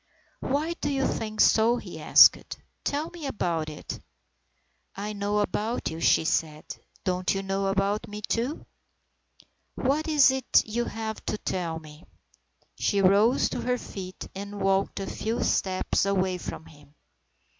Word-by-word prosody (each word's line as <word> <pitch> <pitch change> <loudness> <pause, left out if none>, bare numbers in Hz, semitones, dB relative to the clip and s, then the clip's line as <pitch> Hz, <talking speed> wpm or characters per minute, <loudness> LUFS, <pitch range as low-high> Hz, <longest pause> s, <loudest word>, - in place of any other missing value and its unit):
"Why 300 +5 -1
do 290 - 0
you 275 -1 0
think 215 -1 -1
so?" 230 +2 +5
he - - -8
asked. - - +6 0.3
"Tell 295 +3 -2
me 330 -5 -6
about 170 - -2
it." 150 - -7 0.5
" - - -45
I 210 - -4
know 205 0 -1
about 215 +1 -2
you," 160 - -6
she 160 - +3
said. 155 -1 -1 0.2
" - - -32
Don't 185 +1 0
you 195 - -2
know 195 0 -1
about 195 +2 0
me, 210 0 -8
too? 245 +7 -2 0.3
" - - -31
" - - -39 0.3
What 285 +5 0
is 295 -4 +6
it 265 -1 +3
you 235 +2 -2
have 220 -1 -5
to - - -1
tell 170 -5 -3
me? 155 0 -12 0.4
" - - -33
She 200 - +1
rose 200 +6 +4
to - - -4
her 250 0 0
feet, 185 -5 -8
and 200 +1 -7
walked 195 0 +1
a 195 - -3
few 225 +4 -2
steps 185 0 +1
away 190 -2 0
from 160 - -7
him. 145 -1 -18
200 Hz, 165 wpm, -27 LUFS, 185-240 Hz, 0.5 s, asked